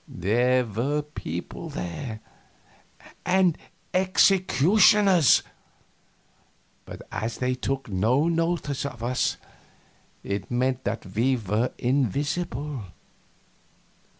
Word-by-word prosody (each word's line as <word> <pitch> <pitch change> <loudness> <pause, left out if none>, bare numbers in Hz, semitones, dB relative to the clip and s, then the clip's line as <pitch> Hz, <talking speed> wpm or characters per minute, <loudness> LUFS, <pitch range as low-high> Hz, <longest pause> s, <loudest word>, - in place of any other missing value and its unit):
There 120 +7 +1
were 130 +8 -1
people 90 - -7
there 110 +6 -6 1.0
and 180 -2 +3 0.4
executioners 185 - +4 1.4
but - - -9
as 110 +1 -3
they 125 0 0
took 135 +1 -3
no 115 - +1
notice 165 -4 -1
of 130 -5 -6
us, 125 +1 0 0.9
it 100 -2 -4
meant 130 +1 -1
that 105 +2 -3
we 125 +5 +2
were 110 +3 -1
invisible. 140 - -1
130 Hz, 85 wpm, -25 LUFS, 115-150 Hz, 1.4 s, executioners